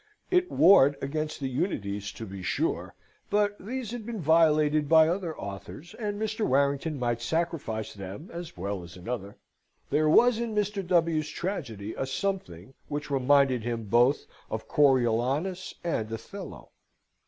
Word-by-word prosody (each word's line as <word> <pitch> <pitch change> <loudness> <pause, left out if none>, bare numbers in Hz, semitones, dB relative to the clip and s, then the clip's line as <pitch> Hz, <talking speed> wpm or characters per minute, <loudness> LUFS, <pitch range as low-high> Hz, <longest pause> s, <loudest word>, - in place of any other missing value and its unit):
It 360 0 +3
warred 145 -6 +6
against 155 +2 -3
the 135 - -2
unities, 105 - -2
to 115 - -7
be 95 -2 -8
sure; 90 - -2 0.3
but 205 0 +2
these 235 +2 -5
had 240 -2 -5
been 225 0 -5
violated 155 -2 +3
by 160 -1 +7
other 170 -2 -2
authors, 100 - -8
and 210 -3 -4
Mr. 220 0 -2
Warrington 140 +1 +1
might 120 -2 -1
sacrifice 145 -6 -2
them 100 - -8
as 170 - -7
well 100 +1 -3
as 85 +1 -11
another. 100 +1 -5 0.5
There 155 +1 +3
was 235 +7 +5
in 230 -2 -3
Mr. 210 -1 0
W.'s 165 -4 +2
tragedy 115 - -4
a 135 - -3
something 135 - -3
which 150 0 -4
reminded 135 -2 +3
him 115 0 -3
both 120 +6 +3 0.2
of - - -4
Coriolanus 135 +7 +2
and 110 -11 -2
Othello. 115 - -8
150 Hz, 145 wpm, -28 LUFS, 120-180 Hz, 0.5 s, by